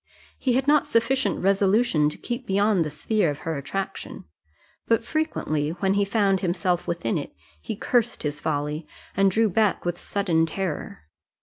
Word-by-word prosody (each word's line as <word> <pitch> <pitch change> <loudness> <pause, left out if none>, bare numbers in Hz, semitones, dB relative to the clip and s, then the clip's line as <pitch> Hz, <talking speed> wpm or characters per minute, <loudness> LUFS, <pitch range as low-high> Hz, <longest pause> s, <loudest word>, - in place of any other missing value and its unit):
He 255 - +1
had 265 +2 +1
not 295 0 +4
sufficient 260 +4 +1
resolution 195 -4 +3
to - - -7
keep 245 +1 -5
beyond 200 -1 +3
the 155 - -3
sphere 170 +5 0
of 145 - -3
her 165 -1 -1
attraction; 150 +8 -5 0.6
but, 230 0 +2
frequently, 160 - -1
when 190 +2 0
he 200 0 +2
found 200 -2 +2
himself 175 0 0
within 170 -10 -1
it, - - -8 0.3
he - - -4
cursed 240 +2 0
his 145 -1 -2
folly, 150 +1 -2 0.3
and 195 0 +4
drew 220 +4 +3
back 210 0 +1
with 175 0 -2
sudden 170 -5 +1
terror. 165 - -4
195 Hz, 165 wpm, -25 LUFS, 160-220 Hz, 0.6 s, not